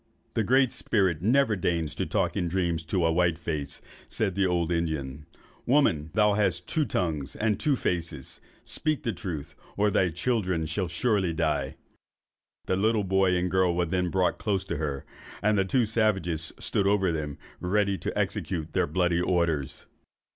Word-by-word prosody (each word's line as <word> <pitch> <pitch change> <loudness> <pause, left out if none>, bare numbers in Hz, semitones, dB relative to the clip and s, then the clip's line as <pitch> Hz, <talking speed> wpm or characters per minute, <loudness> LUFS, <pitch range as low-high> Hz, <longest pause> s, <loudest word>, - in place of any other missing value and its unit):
'The 115 - +1
Great 130 +2 +3
Spirit 95 -7 +1
never 115 +2 +3
deigns 85 -4 -1
to - - -3
talk - - 0
in 90 - 0
dreams 85 -2 -1
to 90 +1 +1
a 80 - +3
white 85 -1 +2
face,' 75 -4 -4 0.3
said 100 -4 -1
the 100 0 +2
old 85 -1 0
Indian: 75 -4 -2 0.4
'woman! 95 - +3
thou 105 -1 +4
hast 95 -4 0
two 155 -2 +1
tongues 80 - -2
and 105 -2 0
two 145 -2 +2
faces: 85 - -3 0.2
speak 155 -2 -1
the 115 - -1
truth, 85 -7 -6 0.2
or 105 0 +3
thy 95 -2 +3
children 90 -2 -1
shall 85 +4 -2
surely 95 0 +1
die.' 75 -4 -1 0.9
The 95 - +1
little 110 +1 +2
boy 95 -1 +2
and 90 0 -1
girl 95 -2 +2
were 90 0 +1
then 90 +1 0
brought 90 0 +1
close 95 -3 -1
to - - -3
her, 70 -3 -3 0.3
and 105 +1 +2
the 95 -2 +2
two 120 +5 +2
savages 95 -8 0
stood 100 - 0
over 100 -3 +3
them, 75 -3 -4 0.2
ready 100 +2 +1
to - - -4
execute 80 -2 -2
their - - +2
bloody 90 +1 +1
orders. 85 -6 0
90 Hz, 170 wpm, -27 LUFS, 80-105 Hz, 0.9 s, thou